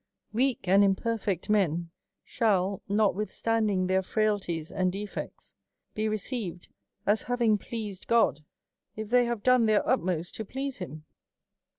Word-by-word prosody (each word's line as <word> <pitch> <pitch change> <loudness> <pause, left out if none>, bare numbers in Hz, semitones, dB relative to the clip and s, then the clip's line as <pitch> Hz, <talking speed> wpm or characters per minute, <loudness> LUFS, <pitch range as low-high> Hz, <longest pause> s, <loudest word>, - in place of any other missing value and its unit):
^*'. - - -52 0.2
* - - -59
" - - -40
Weak 250 -3 +1
and 195 +2 +6
imperfect 200 -2 0
men 175 -5 +1 0.3
shall, 200 -4 +1
notwithstanding 210 0 +1
^ - - -2
their 190 0 +2
frailties 190 -6 -1
and 185 -1 +1
defects, 200 +2 -7 0.4
be 215 0 -1
received, 215 -4 -3 0.4
as 210 +1 +3
having 235 -4 +2
pleas 210 -3 -5
ed - - -12
God, 230 -10 +3 0.6
if 215 0 -6
they 245 0 +5
have 235 -3 -3
done 255 -3 +5
their 215 -1 +2
utmost 180 -8 0
to 220 - -3
please 265 +4 -4
him. 155 -4 -7
210 Hz, 155 wpm, -28 LUFS, 185-225 Hz, 0.6 s, and